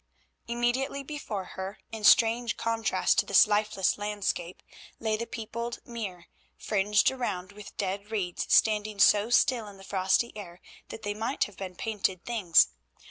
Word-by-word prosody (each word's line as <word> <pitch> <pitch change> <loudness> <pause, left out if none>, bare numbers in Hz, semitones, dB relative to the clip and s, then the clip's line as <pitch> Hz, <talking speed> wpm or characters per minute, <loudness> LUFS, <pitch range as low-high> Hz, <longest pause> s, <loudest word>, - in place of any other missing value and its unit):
Immediately 240 +4 -1
before 270 -9 -5
her, 190 +2 -7
in 220 -1 -7
strange 230 +1 +4
contrast 225 -1 +1
to - - +2
this - - +7
lifeless 210 -2 0
landscape, 205 -4 -3 0.4
lay 220 -1 0
the 235 +2 -4
peopled 235 +1 -5
mere, 200 -7 -6 0.3
fringed 210 +2 +2
around 200 -8 -4
with 205 0 -12
dead 200 +1 -3
reeds 190 -5 -3
standing 215 -1 +3
so 205 +3 +5
still 245 -2 +3
in 200 -1 -12
the 195 - -14
frosty 190 +4 0
air 180 -4 -9 0.3
that 220 - -9
they 205 - -2
might 225 +6 -1
have 205 - -7
been 185 -2 -7
painted 190 -4 -2
things. 205 -9 +4
210 Hz, 150 wpm, -28 LUFS, 195-230 Hz, 0.4 s, this